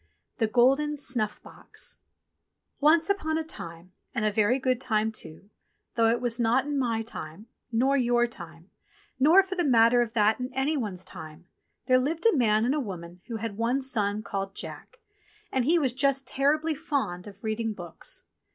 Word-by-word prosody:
THE 225 - +2
GOLDEN 270 +6 +3
SNUFF 245 -7 0
BOX - - -8 0.8
ONCE 320 +5 +4
upon 315 -6 -1
a 320 - -1
time, 170 - -10 0.2
and 215 -3 0
a 215 - +2
very 215 +4 +2
good 255 -2 0
time 220 -3 +1
too, 200 -1 -9 0.4
though 230 -1 +3
it 235 +1 +2
was 240 -1 -1
not 240 +3 +2
in 290 -1 -1
my 230 -3 0
time, 195 -3 -8 0.3
nor 260 +4 +2
your 240 -2 +3
time, 170 -6 -11 0.5
nor 325 +8 +7
for 380 0 -5
the 360 -2 0
matter 240 -3 +5
of 230 -2 -2
that 215 0 +3
in 250 +1 -4
any 275 +4 +1
one's 205 -9 -4
time, 155 +2 -10 0.4
there 255 0 +4
Hved 315 - -2
a 455 - +5
man 220 -4 +3
and 255 - +2
a 300 - 0
woman 180 -7 -7
who 235 - -5
had 220 -2 -4
one 240 +4 +1
son 215 -6 -1
called 195 -1 -4
Jack, - - -8 0.5
and 260 -2 +1
he 335 +5 +4
was 270 -7 +1
just 270 0 +1
terribly 300 +5 +1
fond 275 - -3
of 200 +1 -13
reading 220 +1 -1
books. 175 -5 -8
240 Hz, 180 wpm, -27 LUFS, 210-275 Hz, 0.8 s, nor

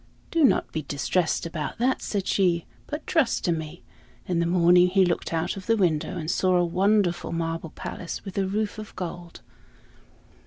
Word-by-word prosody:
"Do 330 -2 +2
not 265 - +3
be 155 - -2
distressed 155 +5 -1
about 165 -2 -4
that," 255 +3 +1
said 200 -3 -2
she, 175 -5 +2 0.2
"but 300 +1 -5
trust 315 -9 +1
to 175 - +2
me." 160 +1 -5 0.4
In 175 -2 0
the 170 - +1
morning 175 0 +5
he 190 +1 +4
looked 175 -1 -1
out 165 +2 -1
of 195 -1 -9
the 225 -1 +3
window 175 -1 +1
and 160 0 -2
saw 185 -1 +2
a 175 0 +3
wonderful 185 +1 +1
marble 165 0 -3
palace, 170 +5 -7
with 195 - -7
a 195 - +1
roof 210 +2 -2
of 215 - -9
gold. 175 -1 -7
180 Hz, 185 wpm, -25 LUFS, 170-195 Hz, 0.4 s, morning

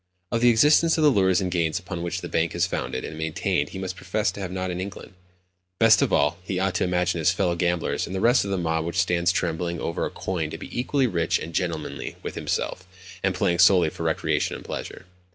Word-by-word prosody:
Of 115 - 0
the 120 - +6
existence 150 +8 +5
of 160 - +2
the 150 - +6
lures 95 -4 +3
and 90 -1 -2
gains 85 -3 0
upon 90 -1 -6
which 85 0 -3
the - - -5
bank 80 0 0
is 85 - +2
founded 65 - -3
and - - -7
maintained 80 -2 -1
he - - -8
must 95 -1 -4
profess 95 +2 -1
to 95 - -10
have 95 -2 -4
not 95 0 -3
an 90 +1 -3
inkling. 100 +1 -8 0.6
Best 115 -1 +6
of - - +1
all, 75 +4 +2
he 90 +1 -4
ought 95 0 0
to 90 - 0
imagine 90 -1 0
his 80 - +3
fellow 90 -1 +1
gamblers 85 -1 -1
and 95 - -5
the - - -1
rest 120 +5 +4
of 100 - -5
the 95 - 0
mob 80 -2 0
which 85 +1 -4
stands 85 0 +2
trembling 85 -1 -2
over 85 - -2
a - - -1
coin 85 -5 -3
to - - -6
be - - -10
equally 135 +2 +1
rich 85 -8 +1
and 85 - -7
gentlemanly 85 -4 -3
with - - -5
himself, 90 0 -3 0.3
and 95 -1 0
playing 85 -1 +1
solely 90 -3 +5
for - - -10
recreation - - 0
and - - -10
pleasure. - - -6
90 Hz, 240 wpm, -25 LUFS, 85-95 Hz, 0.6 s, the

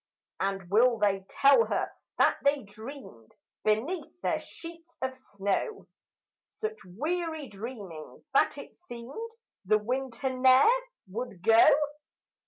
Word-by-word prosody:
And 195 -1 -2
will 235 +3 +5
they 195 -2 +1
tell 280 +12 +5
her - - -1 0.3
that - - +4
they 280 -1 +3
dreamed, 215 - -11 0.3
Beneath 280 +12 -1
their - - +1
sheets 335 0 -12
of 260 0 -2
snow, 205 - -3 0.7
Such 440 0 -3
weary 310 - -3
dreamings 200 -7 -8
that 275 - +3
it 280 - -10
seemed 245 - -7 0.4
The 215 +3 +4
winter 260 +3 -2
ne'er 260 - +6 0.4
would 200 -3 -6
go? 225 +2 +7
250 Hz, 115 wpm, -29 LUFS, 205-290 Hz, 0.7 s, go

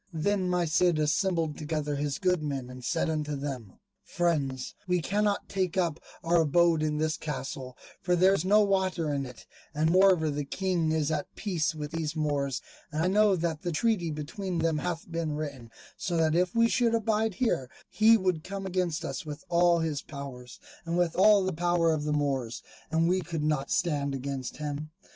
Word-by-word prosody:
Then 185 +3 +1
my 180 -1 +1
Cid 175 +1 +3
assembled 160 +1 0
together 150 -1 -2
his 145 -1 -2
good 180 -3 +1
men 135 -4 -4
and 125 0 -10
said 165 +7 0
unto 150 -2 -2
them, 135 -8 -5 0.3
"Friends, 140 -7 -1
we 180 0 +2
cannot 205 +4 0
take 190 -1 -1
up 170 -4 +1 0.2
our 170 0 +3
abode 165 +1 +3
in 150 -1 0
this 155 +1 0
castle, 135 -3 -5 0.2
for 180 0 +2
there 185 +2 +5
is 185 - 0
no 205 +3 +5
water 190 -6 +1
in 140 -1 -2
it, 125 -2 -12 0.3
and 155 +2 +2
moreover 185 -4 +4
the 145 0 -2
King 175 +1 -1
is 160 -1 0
at 150 -2 -1
peace 170 -6 -1
with 150 -1 -5
these 165 -1 -3
Moors, 145 -4 -1 0.3
and 155 +1 -1
I - - +2
know 205 0 +4
that 165 -2 -2
the 175 - -2
treaty 180 0 +1
between 170 +5 -4
them 165 -2 +1
hath 175 -1 -3
been 165 -2 -2
written; 140 -6 -6 0.3
so 175 -4 -2
that 160 -1 +2
if 180 +3 +1
we 230 0 +5
should 230 -1 +2
abide 220 -2 0
here 155 - 0 0.2
he 225 +1 +5
would 185 -5 0
come 195 0 -5
against 180 -3 -1
us - - -4
with 150 -1 -7
all 170 0 +4
his 155 -3 -1
power, 140 -4 -8 0.4
and 170 0 -2
with 175 -2 +1
all 200 +1 +6
the 185 - -1
power 170 0 +2
of 150 -1 -2
the 150 - 0
Moors, 135 -5 -1 0.3
and 165 +1 +2
we 185 +1 +2
could 165 -2 -4
not 150 -2 0
stand 145 -6 0
against 135 -1 -5
him. 150 0 -4
160 Hz, 195 wpm, -28 LUFS, 150-180 Hz, 0.4 s, all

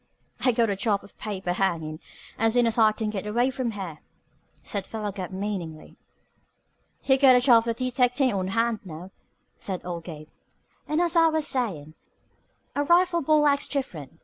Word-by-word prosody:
"I 255 - +5
got 230 -2 +1
a - - -1
job 200 0 0
of - - -17
paper 190 -4 -3
hangin' 165 -5 -1 0.4
as 225 0 +3
soon 245 -1 +4
as 230 0 0
I 220 -1 +6
can 215 0 -3
get 210 -1 -4
away 240 +5 +1
from 255 -2 -2
here," 190 -8 -6 0.6
said 200 -3 -4
Philo 215 -2 -4
Gubb 185 -2 -6
meaningly. 185 -5 -5 1.1
"You 265 -1 +3
got 265 -2 +7
a - - +6
job 240 -2 +5
of 230 - 0
detectin' 255 +1 +1
on 190 -2 -1
hand 230 +2 0
now," 175 +1 -9 0.5
said 185 -3 -5
old 170 -2 -5
Gabe. 155 -3 -9 0.6
"And, 305 +3 +1
as 345 0 0
I 330 -1 +6
was 315 -1 0
sayin', 175 - -2 0.8
a 290 - +1
rifle 345 +2 +3
ball 300 0 +3
acts 280 -1 +2
different. 165 - -5
220 Hz, 175 wpm, -25 LUFS, 185-260 Hz, 1.1 s, got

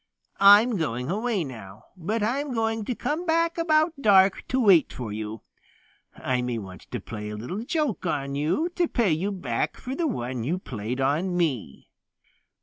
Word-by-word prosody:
I'm 205 +3 +7
going 125 -4 -2
away 215 -1 0
now, 110 -7 -10
but 205 +5 -2
I'm 265 +4 -1
going 225 -1 -1
to 250 - -2
come 305 +8 -2
back 335 +1 +1
about 315 0 +3
dark 195 -3 +5
to 260 - 0
wait 195 -9 +5
for 115 -5 -6
you. 110 +1 -6 0.7
I 125 -1 -1
may 125 -1 -2
want 95 -4 -9
to - - -4
play 105 -2 -7
a 105 - -5
little 175 - -5
joke 285 - -1
on 140 -3 -2
you 155 - 0
to 350 -2 +2
pay 230 - +1
you 175 +6 0
back 135 -12 -2
for 255 - -6
the 330 +3 0
one 125 - -3
you 160 +9 -1
played 125 - -5
on 160 +7 0
me." 135 - -2
185 Hz, 175 wpm, -25 LUFS, -, 0.7 s, I'm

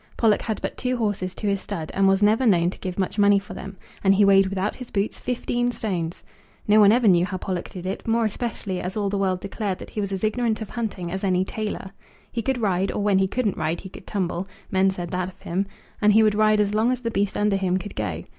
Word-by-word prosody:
Pollock 220 -3 +3
had 220 -2 -3
but - - -3
two 255 0 -1
horses 205 -5 -1
to - - -6
his 200 -1 +1
stud, 165 -7 -5
and 195 0 +3
was 195 +1 +3
never 215 +5 +4
known 175 -4 +4
to - - -11
give 185 -2 -5
much 195 +2 -1
money 200 0 +6
for 195 - -5
them; 195 0 -8 0.3
and 195 0 +5
he 205 +1 +5
weighed 195 -1 +6
without 195 +2 -2
his 250 -2 -9
boots, 200 +1 -1
fifteen 245 0 -1
stones! 180 -8 -3 0.4
No 210 +1 +6
one 205 -1 +7
ever 235 0 +3
knew 175 -3 +5
how 185 0 -2
Pollock 185 -1 -4
did 185 -1 -8
it; 190 +4 -4
more 230 0 +2
especially 210 -4 -3
as 185 +4 -4
all 205 -2 0
the 200 - -1
world 185 -2 0
declared 200 -1 -3
that - - -10
he 210 - -3
was 200 -1 -3
as 195 0 -3
ignorant 220 0 +1
of 220 - -7
hunting 205 -7 -4
as 190 +2 -4
any 185 -1 +2
tailor. 210 -2 -4 0.4
He 235 - -2
could 265 +3 0
ride, 195 -4 +1
or 205 - -2
when 200 -2 +3
he 190 - +3
couldn't 215 -1 -1
ride 160 +2 -1
he 190 - -9
could - - -13
tumble, 185 -2 -2 0.2
men 190 0 +3
said 175 -3 -4
that 185 0 -1
of 190 - -18
him, 190 +4 -2 0.3
and 210 -1 +5
he 220 +1 +6
would 215 -1 +4
ride 215 0 +3
as 205 0 +1
long 220 +3 +3
as 255 -1 -2
the 230 -1 -2
beast 200 -2 0
under 205 -1 +2
him 185 -1 +1
could 200 +2 -7
go. - - -3
200 Hz, 260 wpm, -24 LUFS, 190-215 Hz, 0.4 s, one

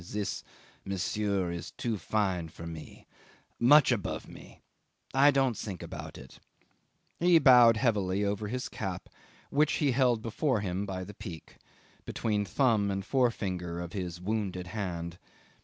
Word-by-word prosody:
"This, 105 +2 -4 0.4
monsieur, 100 -1 -1
is 85 -2 -5
too 115 -2 -3
fine 95 -3 -1
for 85 +1 -10
me 80 -1 -9 0.5
much 140 +3 +6
above 110 -6 -2
me - - -14 0.5
I 135 +3 +6
don't 135 -4 +2
think 95 -5 -6
about - - -8
it." 65 0 -13 0.8
He 175 0 +6
bowed 125 -6 +7
heavily 105 -5 +1
over 100 +1 -2
his 125 +4 -3
cap, - - -5 0.4
which 150 +2 +3
he 145 -3 +2
held 125 -3 +2
before 120 0 0
him 95 +1 -2
by 95 -1 -4
the 100 +3 -9
peak, 90 -5 -10 0.5
between 105 -2 -1
the - - -13
thumb 110 -6 +2
and 100 0 -2
the - - -20
forefinger 95 -10 0
of 85 -1 -6
his 90 -3 -4
wounded 95 -2 -2
hand. 85 -5 -4
105 Hz, 150 wpm, -30 LUFS, 90-120 Hz, 0.8 s, bowed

